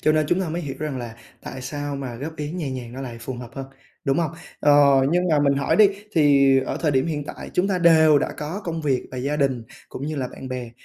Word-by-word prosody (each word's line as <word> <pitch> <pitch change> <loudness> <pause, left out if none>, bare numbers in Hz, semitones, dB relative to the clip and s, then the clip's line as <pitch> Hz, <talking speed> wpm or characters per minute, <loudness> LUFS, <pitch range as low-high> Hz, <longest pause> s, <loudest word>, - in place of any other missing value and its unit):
cho 155 - +3
nên 155 -1 +2
chúng 175 +5 +1
ta 180 - -2
mới 170 +2 -3
hiểu 135 -3 -5
rằng 150 -4 -3
là 120 -2 -7 0.3
tại 130 -1 -7
sao 145 +1 -4
mà 130 -3 -5
góp 150 +7 -6
ý 150 0 -4
nhẹ 170 -6 -3
nhàng 125 -2 -6
nó 130 - -7
lại 125 -3 -6
phù 130 +3 -5
hợp 120 -1 -9
hơn, 135 -1 -6 0.4
đúng 135 0 +1
không? 165 -3 0 0.3
Ờ, 145 - +5 0.4
nhưng 180 +1 +2
mà 150 - +4
mình 140 -1 +3
hỏi 140 0 +1
đi 215 -2 +7 0.2
thì 140 -3 +5
ở 130 - -3
thời 155 -3 +2
điểm 130 +2 +1
hiện 150 -3 -3
tại - - -8
chúng 185 +3 +2
ta 185 -2 0
đều 160 -3 +6
đã - - -2
có 160 +8 -5
công 165 -2 -3
việc 135 -4 +1
và 130 - -7
gia 140 +4 -1
đình 135 -5 0 0.3
cũng 140 - -6
như 155 -1 -3
là 130 -2 -2
bạn 130 - -9
bè 125 -2 -5
145 Hz, 270 wpm, -23 LUFS, 130-155 Hz, 0.4 s, đi